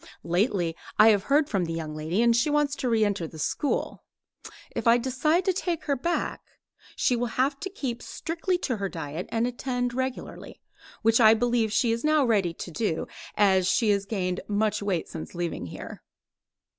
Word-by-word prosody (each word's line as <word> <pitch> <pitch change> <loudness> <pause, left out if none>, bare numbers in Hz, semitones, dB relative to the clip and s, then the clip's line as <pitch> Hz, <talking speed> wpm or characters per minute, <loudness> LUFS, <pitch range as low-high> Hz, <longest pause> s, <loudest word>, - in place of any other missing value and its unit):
Lately 175 -2 0 0.2
I 215 +1 +8
have 205 -3 +3
heard 290 +1 +3
from 195 -9 0
the 165 - -4
young 160 -2 -4
lady, 160 +8 0
and 235 -1 +4
she 235 +6 +2
wants 295 -1 +1
to 255 - -1
re 225 -2 +3
enter 200 -5 -1
the 160 - -12
school. 275 - -2 0.7
If - - -2
I 230 +1 +7
decide 285 +8 +1
to 375 - +2
take 345 -3 -2
her 285 - 0
back, 340 +7 -2 0.5
she 250 - +2
will 240 +1 -1
have 275 +2 +1
to 385 - -4
keep 265 -11 -4
strictly 340 +2 -2
to 250 -5 -1
her 200 -1 -2
diet 160 0 -5
and 230 0 0
attend 245 0 -2
regularly, 260 0 -5 0.4
which 225 +2 +4
I 220 0 +8
believe 235 -1 +1
she 230 +2 +2
is 230 0 -2
now 305 -2 +3
ready 200 -7 +2
to 170 +1 -8
do, 165 -2 -1 0.3
as 190 -3 +4
she 220 0 +3
has 200 -1 0
gained 185 -4 -2
much 210 +1 0
weight 195 -5 -1
since 160 +2 -8
leaving 170 - -3
here. - - -9
225 Hz, 190 wpm, -26 LUFS, 190-260 Hz, 0.7 s, I